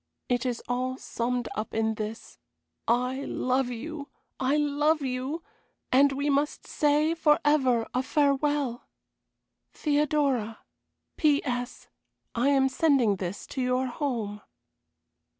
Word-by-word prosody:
It 245 0 0
is 245 -2 -3
all 255 +1 -1
summed 245 -1 -2
up 215 +1 -4
in 220 0 +1
this. 215 +1 -6 0.5
I 250 +3 +1
love 255 -1 0
you! 285 +5 -6 0.3
I 265 +3 +2
love 295 +1 +2
you! 265 +5 -3 0.5
and 275 +2 +5
we 280 +2 -1
must 285 +1 0
say 300 +2 +2
forever 295 -7 +3
a 255 - +1
farewell! 280 -2 +1 0.9
"THEODORA. 285 -7 +1 0.6
"P.S. 260 -5 0 0.5
I 245 +4 +2
am 270 -1 +4
sending 260 -6 +3
this 185 +1 -5
to 265 - -4
your 255 +1 +1
home." 240 -6 -3
265 Hz, 115 wpm, -27 LUFS, 245-290 Hz, 0.9 s, and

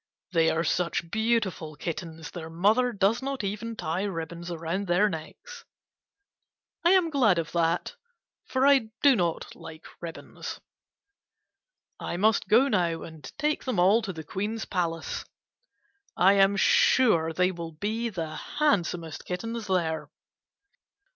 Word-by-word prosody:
They 165 -2 +3
are 165 - 0
such 170 0 -1
beautiful 220 -8 0
kittens 165 0 -6
their 160 -2 -7
mother 215 +9 +2
does 205 +3 +1
not 270 -3 -3
even 210 +3 -4
tie 165 -1 -2
ribbons 170 -3 -4
around 170 +4 -3
their 180 +4 +4
necks. 175 - -8 1.2
I 345 +2 +5
am 360 -4 +3
glad 235 - +4
of 165 -2 -2
that, 170 0 0 0.5
for 260 +1 +1
I 275 -5 +5 0.2
do 280 -2 +7
not 170 -5 -2
like 160 +1 -11 0.2
ribbons. 170 -1 -7 1.4
I 170 - -4
must 215 +3 +2
go 240 +6 +5
now 175 -8 0
and 155 -4 -10
take 300 0 -1
them 255 -6 -1
all 195 +6 +5
to 210 -3 -4
the 160 -3 -8
Queen's 210 +8 -3
palace. 165 -3 -2 0.9
I 190 +2 +6
am 195 0 +4
sure 180 -7 +4
they 180 +3 +2
will 170 -2 -7
be 220 +8 -2
the 165 -6 -4
handsomest 175 - -1
kittens 225 +4 -4
there. 160 -5 -1
185 Hz, 135 wpm, -27 LUFS, 165-225 Hz, 1.4 s, do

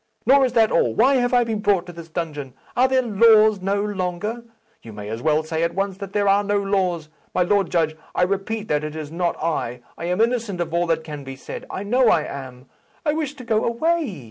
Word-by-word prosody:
Nor 270 +1 +6
is 250 - -2
that 225 -2 +4
all. - - +2
Why 265 +4 +4
have 245 -1 +1
I 245 -1 +4
been 225 -2 -2
brought 205 -3 +2
into 175 0 -11
this 170 -1 -10
dungeon? 150 -6 -5 0.2
Are 255 +2 +4
there 260 0 +2
laws 215 -2 +5
no 200 +2 0
longer? 205 +3 -3 0.4
You 115 - -11
may 105 0 -7
as 115 +2 -4
well 155 +2 +2
say 160 +1 -3
at 170 0 0
once 195 -1 -1
that 200 -1 -7
there 205 0 +1
are 200 +1 +4
no 205 0 +1
laws. 185 -5 -1 0.3
My 180 - +4
Lord 195 0 +1
Judge, 160 -3 +1 0.2
I - - +3
repeat 200 +3 -2
that 150 0 +1
it 155 0 -5
is 155 -1 -6
not 170 +1 -1
I. 125 -7 -2 0.2
I 165 - -4
am 180 +3 -1
innocent 230 -5 0
of 170 -1 -3
all 170 0 +1
that 165 -1 0
can 150 -3 -7
be 135 0 -8
said. 130 - -8
I 190 - -5
know 245 +4 +3
I 160 - +3
am. 130 -3 -8 0.4
I 295 - +2
wish 305 -2 -3
to 260 - -10
go 220 -2 +1
away. 290 - 0
195 Hz, 240 wpm, -22 LUFS, 160-225 Hz, 0.4 s, Nor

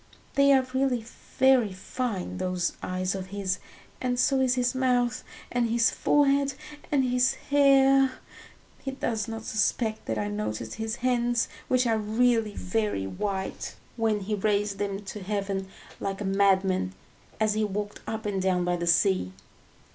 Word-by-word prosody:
They 280 0 +5
are 265 -1 +5
really 260 -3 +1 0.3
very 260 -6 +5
fine, 190 -2 -4
those 180 -1 -1
eyes 185 +1 -2
of 190 -1 -5
his, 190 -1 -2 0.4
and 245 -1 0
so 270 +1 +3
is 260 -1 +3
his 250 0 +1
mouth, 250 -2 +1 0.3
and 240 -1 +1
his 230 0 +3
forehead 280 -1 +2 0.4
and 280 -2 +3
his 250 +1 +2
hair. 275 -2 +4 0.7
He 270 - -3
does 230 -4 -2
not 225 -1 -5
suspect 220 0 0
that 110 - -1
I 105 -1 -1
noticed 105 +2 -3
his 220 0 -2
hands, 240 -1 +1 0.2
which 255 0 +2
are 225 -2 +2
really 225 0 +1
very 205 - -1
white, 190 - -4 0.2
when 220 -3 +1
he 205 +3 -3
raised 205 0 0
them 200 0 -2
to 205 +1 -7
heaven, 195 -1 -2 0.3
like 195 0 -3
a 205 - -3
madman, 190 - +2 0.4
as 215 -1 +2
he 215 0 0
walked 205 0 -3
up 220 0 -4
and 200 -2 -1
down 185 -1 +1
by 175 0 +1
the 170 0 -3
sea. 170 - +3
215 Hz, 155 wpm, -27 LUFS, 190-250 Hz, 0.7 s, They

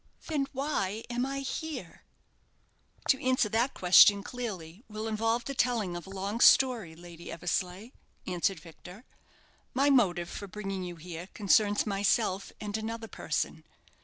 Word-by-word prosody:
"Then 290 -4 -1
why 240 -7 -2
am 245 +2 -1
I 275 0 -3
here?" 270 - -6 1.0
"To 265 - +3
answer 255 -3 +2
that 235 +5 0
question 200 +2 +7
clearly 205 -6 -6
will 215 +1 -5
involve 225 +2 0
the 275 - -3
telling 230 -9 0
of 175 0 -7
a - - -10
long 195 +3 -4
story, 235 -12 +5
Lady 170 0 -11
Eversleigh," 180 +5 -3 0.3
answered 180 0 -1
Victor. 180 +7 -13 0.7
"My 280 +2 +4
motive 180 -10 +3
for 200 - -7
bringing 195 -1 -5
you 175 -1 -6
here 170 +1 -8
concerns 205 0 +3
myself 200 -1 0
and 210 0 -3
another 225 +1 -5
person. - - -3
210 Hz, 140 wpm, -30 LUFS, 180-245 Hz, 1.0 s, question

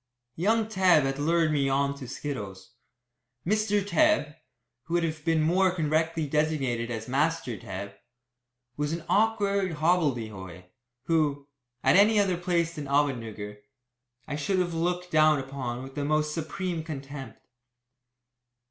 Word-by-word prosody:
Young 220 +6 +2
Tebb 185 -7 +4
had 135 +1 -2
lured 165 +1 +2
me 140 -2 +1
on 140 +1 +1
to 130 - -7
skittles. 105 -9 -6 0.7
Mr. 210 +1 +1
Tebb 205 - +2 0.5
who 170 - -2
would 175 - +2
have 155 -2 -3
been 160 -1 +2
more 185 +4 +3
correctly 160 -1 0
designated 140 -6 0
as 115 -2 -5
"Master" 145 -1 0
Tebb 100 -2 -7 0.8
was 150 +1 -1
an 165 0 -5
awkward 200 -4 +2
hobbledehoy, 120 - -1 0.4
who, 145 -2 0 0.4
at - - +5
any 210 +1 +5
other 195 -3 +2
place 170 -1 0
than 150 -3 -6
Ahmednugger, 115 -8 -1 0.7
I 150 - -3
should 150 +6 -1
have 175 -2 0
looked 180 +2 -2
down 155 -1 +5
upon 130 -2 -5
with 135 0 -10
the 145 - -3
most 150 +1 +1
supreme 165 +1 -3
contempt. 135 -5 -7
155 Hz, 135 wpm, -27 LUFS, 135-175 Hz, 0.8 s, at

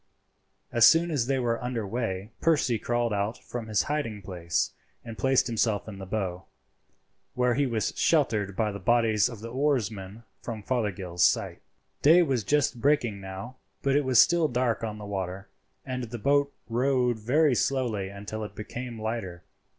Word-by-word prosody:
As 120 0 +7
soon 170 +1 +4
as 130 -6 0
they 135 0 +1
were 120 -2 -1
under 120 -3 -2
weigh 105 -2 -3
Percy 145 -8 +2
crawled 120 -2 0
out 100 +3 -1
from 120 -2 -7
his 105 -2 +2
hiding 115 -9 -3
place 85 -3 -1 0.3
and 115 -1 -7
placed 130 +6 +2
himself 110 -3 0
in 100 -2 -8
the 95 - -7
bow, 95 -3 -3 0.9
where 125 -1 +2
he 140 +2 +1
was 115 -4 -1
sheltered 110 - +1
by 110 0 0
the 100 - -6
bodies 110 +1 +3
of 115 -4 -9
the 115 - -6
oarsmen 115 -7 -1 0.2
from 110 -3 -6
Fothergill's 95 -8 -1
sight. - - +2 0.4
Day 165 +5 +7
was 130 -8 0
just 140 -1 +1
breaking 120 -8 +1
now, 95 +7 -8 0.3
but 140 0 +2
it 145 - +3
was 130 -3 +4
still 170 +4 +5
dark 125 -3 0
on 110 -1 -3
the 105 - -8
water, 95 -1 -4 0.4
and 130 -2 -3
the 120 +1 -6
boat 140 +4 +2 0.2
rowed 125 -1 +1
very 140 +6 +3
slowly 120 -7 0
until 100 +2 -6
it 105 - -8
became 120 +2 -6
lighter. 110 -6 -4
115 Hz, 170 wpm, -27 LUFS, 105-130 Hz, 0.9 s, As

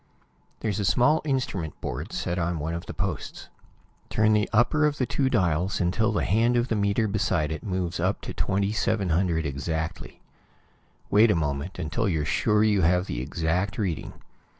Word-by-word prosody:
There's 110 -1 -1
a - - 0
small 125 - +3
instrument 125 - -2
board - - -5
set 90 0 -2
on 85 0 -1
one 80 +2 -3
of 85 - -5
the - - -5
posts. - - -4 0.6
Turn 110 0 +3
the 105 -1 +2
upper 150 +7 +3
of 145 -1 -2
the 130 - +1
two 135 +1 0
dials 90 -2 +1
until 105 +6 +1
the 105 - 0
hand 115 +5 +2
of 120 +1 0
the 115 - +1
meter 100 +2 +1
beside 95 -7 0
it 80 - -4
moves 90 -3 -2
up - - 0
to - - -6
2700 95 -4 0
exactly. 80 +5 -4 0.9
Wait 110 +3 +6
a 105 - +3
moment, 75 +2 -2
until 90 +6 -1
you're 80 -4 0
sure 105 +7 +2
you 105 -3 +3
have 90 +2 +3
the - - -4
exact 85 - -1
reading. 95 -8 -2
95 Hz, 175 wpm, -26 LUFS, 80-110 Hz, 0.9 s, Wait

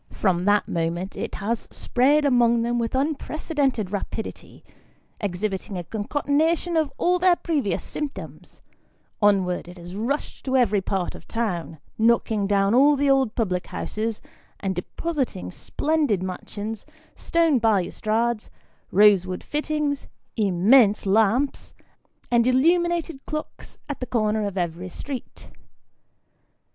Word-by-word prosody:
From 180 -3 0
that 205 0 +3
moment 170 +3 -2
it - - -4
has 220 +3 -2
spread 285 +4 +2
among 235 -3 +4
them 240 +1 0
with 230 +1 -2
unprecedented 280 - -1
rapidity, 205 +2 -6 0.6
exhibiting 195 0 -3
a 175 - -4
concatenation 290 - 0
of 310 -3 +1
all 360 +1 +2
the 360 -1 +4
previous 280 - 0
symptoms; 300 -2 -7 0.6
onward 190 -4 +2
it 180 +1 -11
has 175 +1 -9
rushed 245 +8 -3
to 265 0 +2
every 210 -5 +3
part 190 -1 -2
of - - -13
town, 180 -8 -3 0.2
knocking 220 -2 +2
down 200 0 +2
all 285 +4 +6
the 280 0 +2
old 265 -5 +2
public 185 -6 -1
houses, 220 0 -4 0.4
and 195 -1 -1
depositing 250 - -3
splendid 290 - 0
mansions, 205 +3 -5 0.3
stone 330 -5 +2
balustrades, 220 +2 0 0.4
rosewood 190 -2 +4
fittings, 300 -1 -2 0.3
immense 210 +2 +4
lamps, 225 +7 +1 0.6
and 240 0 +4
illuminated 335 +2 +2
clocks, 305 0 -6
at 290 - -5
the 255 - -4
corner 215 -3 0
of 200 -1 -6
every 175 +1 -3
street. 265 +7 -8
225 Hz, 120 wpm, -24 LUFS, 195-285 Hz, 0.6 s, all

